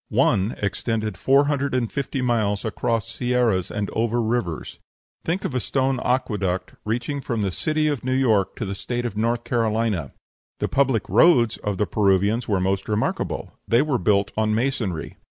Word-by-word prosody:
One 100 +3 +2
extended 110 +1 -2
four 135 +9 +4
hundred 140 -2 0
and 120 -3 0
fifty 135 -1 -2
miles 110 -4 0
across 115 0 -1
sierras 120 -6 0
and 105 -1 -2
over 115 +1 0
rivers. 110 -8 -2 0.4
Think 175 +4 -1
of - - -2
a 130 - +1
stone 130 +3 0
aqueduct 105 -8 -1
reaching 120 +6 -2
from 115 -5 -2
the 95 - 0
city 155 - 0
of 145 -4 -1
New 130 - -1
York 110 -7 +2
to 115 - -4
the 100 - -3
State 120 +5 -3
of 115 - -3
North 115 +2 0
Carolina! 110 - 0 0.4
The - - -2
public 135 -6 +1
roads 125 -10 +4
of 105 -2 -3
the 105 - +1
Peruvians 100 +4 +2
were 100 -3 +1
most 95 +2 -1
remarkable; 105 +1 -2
they 120 +4 +4
were 145 -5 0
built 100 +2 +2
on 110 0 +1
masonry. 115 - -2
115 Hz, 170 wpm, -23 LUFS, 100-125 Hz, 0.4 s, four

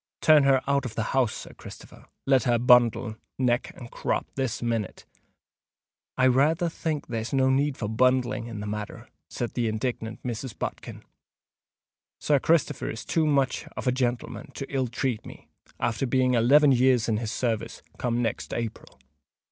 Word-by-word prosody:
Turn 155 -3 +5
her 135 -1 +4
out 140 -1 +2
of 110 -4 -6
the 115 - -1
house, 130 -5 +2
Sir - - -9
Christopher—let 135 -2 -3
her 120 -2 +3
bundle, 120 -2 +4 0.2
neck 125 -1 0
and 120 -2 -10
crop, - - -2
this 130 -3 -2
minute!" 115 -4 -3 1.1
"I 130 - +2
rayther 150 +7 +3
think 155 -2 -3
there's 115 +1 -4
no 130 0 +3
need 140 +1 +1
for 105 - -3
bundling 125 +1 +1
in 110 -3 -6
the - - -5
matter," 105 0 -6 0.2
said 120 - -4
the 120 -2 0
indignant 110 0 -3
Mrs. 120 0 -5
Bodkin. - - -6 1.2
"Sir 145 -2 +2
Christopher 150 -1 +1
is 115 - -6
too 160 -2 +1
much 140 -3 +1
of - - -4
a 125 - +3
gentleman 125 +3 -2
to 135 - -4
ill 130 -2 +1
treat 120 -1 -2
me, - - -13 0.3
after 120 +4 -1
being 130 0 +2
eleven 140 +5 +5
years 125 -2 +3
in 110 -2 +1
his 110 -1 -3
service 115 -4 -3 0.2
come 120 0 0
next 115 - -3
Aperil. 115 -2 -6
125 Hz, 165 wpm, -26 LUFS, 115-135 Hz, 1.2 s, Turn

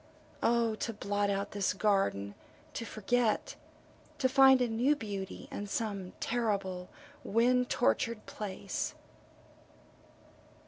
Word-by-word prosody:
O 230 -1 +3
to 230 - -3
blot 205 -1 -1
out 200 0 -1
this 200 -2 0
garden 195 - +1 0.4
to 230 - -4
forget, 225 +1 0 0.6
to 260 - +3
find 265 0 +7
a 250 - +2
new 240 +6 +2
beauty 200 -6 -6
in 205 - -4
some 200 -4 -3
terrible 200 -6 -1 0.3
wind 245 +3 +3
tortured 215 - +1
place. 195 -1 -4
215 Hz, 105 wpm, -32 LUFS, 195-235 Hz, 0.6 s, find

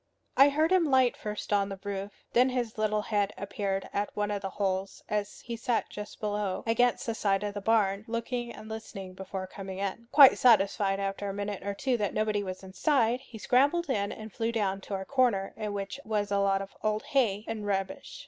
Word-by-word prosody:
I 275 +1 +7
heard 310 +4 +2
him 370 -3 +5
light 260 -2 +4
first 210 0 -4
on 200 -1 +2
the 195 -1 -6
roof; 200 0 -4 0.2
then 250 +2 +5
his 245 -3 -2
little 215 -1 +1
head 205 -2 0
appeared 195 -1 -3
at 205 +1 0
one 210 0 -1
of 205 -1 -2
the 195 - -3
holes 190 0 -2
as 210 -1 -3
he 235 - -5
sat 230 0 -1
just 210 0 -8
below, 205 -2 -2
against 235 +1 +2
the 230 - -1
side 200 -2 +1
of 205 -1 -2
the 205 - -5
barn, 205 -1 +2
looking 235 +1 -3
and 215 - -10
listening 200 -4 -7
before 190 0 -5
coming 190 0 -7
in. 200 +4 -4
Quite 280 -2 +8
satisfied 200 -4 +4
after 195 +1 -2
a 195 - -4
minute 205 -1 -3
or 200 0 -3
two 255 +3 0
that 205 -3 -2
nobody 215 -1 +1
was 185 -1 -6
inside, 235 +4 +1
he 245 -3 -12
scrambled 280 +8 +2
in 200 -4 0
and 215 -1 -8
flew 230 0 -1
down 200 -4 -1
to 200 - -1
a 190 0 -4
corner 240 -7 +1
in 215 -1 -4
which 200 +5 -4
was 210 -2 -1
a 200 - +2
lot 195 0 +2
of 195 - -13
old 215 0 0
hay 220 -6 +2
and 215 -2 -4
rubbish. 195 -1 -3
210 Hz, 215 wpm, -29 LUFS, 195-230 Hz, 0.2 s, Quite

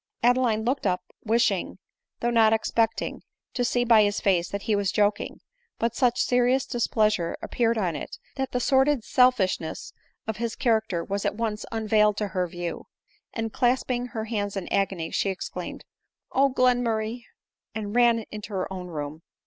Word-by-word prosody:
Adeline 240 -3 +3
looked 255 -3 0
up, 180 -1 0 0.2
wishing, 230 +2 +1 0.4
though 240 - +1
not 225 -2 +5
expecting, 225 0 0 0.3
to 245 - 0
see 245 0 +1
by 225 -2 +6
his 205 0 +1
face 175 -3 +1
that 200 0 -4
he 215 - +1
was 200 -2 0
joking; 205 0 0 0.4
but 230 0 -1
such 245 0 +2
serious 250 +1 +2
displeasure 215 -7 0
appeared 230 -1 0
on 180 -6 0
it, - - -6 0.2
that 265 -1 -2
the 250 - 0
sordid 265 0 +3
selfishness 215 -11 +1 0.3
of 220 -2 -3
his 235 0 -3
character 220 -7 +1
was 200 0 -3
at - - -1
once 215 -1 -3
unveiled 215 -2 +2
to 210 -1 -1
her 185 -1 -1
view; 175 0 -6 0.4
and 225 -1 -4
clasping 250 0 +1
her 220 -3 -5
hands 205 -3 -2
in 190 - -4
agony, 190 -4 0
she 200 - 0
exclaimed, 190 - -6 0.3
" - - -59
Oh, 275 +1 +4
Glen 250 -1 +3
murray 230 0 -2 0.2
!" - - -52
and 210 0 -4
ran 235 -2 +4
into 210 0 -7
her 190 0 -2
own 180 -1 -6
room. 155 -2 -6
220 Hz, 175 wpm, -26 LUFS, 200-240 Hz, 0.4 s, by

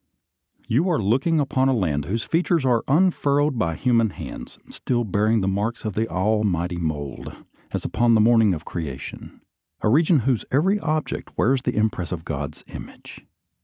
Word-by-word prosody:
You 150 +11 +2
are 165 - +2
looking 130 - +1
upon 135 -2 +1
a 130 - +2
land 75 -9 -1
whose 110 +7 -2
features 165 -3 +1
are 120 -3 +2
un 180 +7 +4
furrowed 145 -4 0
by 85 -6 0
human 115 -1 +2
hands, - - -9
still 120 -2 -2
bearing 110 +1 +1
the 95 - -1
marks 105 +5 -2
of 105 - -2
the 110 +4 -1
Almighty 95 -3 0
mould, 75 -5 -4 0.3
as - - -4
upon 115 0 +2
the - - +4
morning 110 -4 +4
of 80 - -9
creation; 70 -6 -7 0.4
a - - +2
region 155 +3 +4
whose 125 -1 0
every 190 +10 +2
object 155 -3 -3
wears 130 +2 +2
the 125 -1 -2
impress 105 -5 -1
of 80 -3 -5
God's 75 0 -5
image. - - -11
115 Hz, 170 wpm, -23 LUFS, 95-135 Hz, 0.4 s, un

